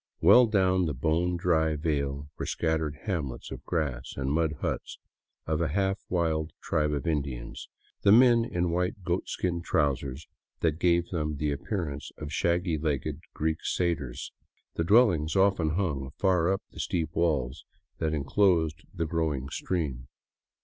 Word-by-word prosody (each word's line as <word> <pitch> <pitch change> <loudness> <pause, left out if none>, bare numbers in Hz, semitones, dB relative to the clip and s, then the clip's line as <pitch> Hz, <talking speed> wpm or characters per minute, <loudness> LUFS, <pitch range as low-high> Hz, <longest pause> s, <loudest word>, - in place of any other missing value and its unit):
Well 125 -1 +7
down 95 -4 +2
the 75 - -2
bone 85 +6 +1
dry 80 -3 +2
vale 70 -2 -2
were - - -4
scattered 80 -2 -1
hamlets 75 - -3
of - - -7
grass 75 -8 -2
and 70 0 -1
mud 80 0 +1
huts - - -3 0.5
of 80 0 0
a 85 - +2
half 95 +5 0
wild 80 -3 0
tribe 75 -2 0
of 70 -2 -2
Indians, 70 -6 -3 0.3
the 100 - +5
men 120 +1 +7
in 90 -7 -1
white 90 +3 -1
goatskin 90 0 -1
trousers 70 -3 -1 0.4
that 80 -1 +1
gave 85 -1 +2
them 75 -4 -2
the 75 0 0
appearance 75 -2 -3
of 75 -1 -6
shaggy 85 -1 +1
legged 75 -1 -2 0.2
Greek 80 +1 0
satyrs, 85 -8 -2 0.4
the 85 - -1
dwellings 85 -6 +4
often 95 -5 +3
hung 75 -9 -1
far 90 -2 +3
up 95 - -1
the - - -12
steep 80 -2 -2
walls 75 -4 0 0.4
that 80 -1 0
enclosed 80 +1 +2
the 85 -3 -2
growing 75 -5 -1
stream. 70 -9 -3
80 Hz, 150 wpm, -28 LUFS, 75-90 Hz, 0.5 s, Well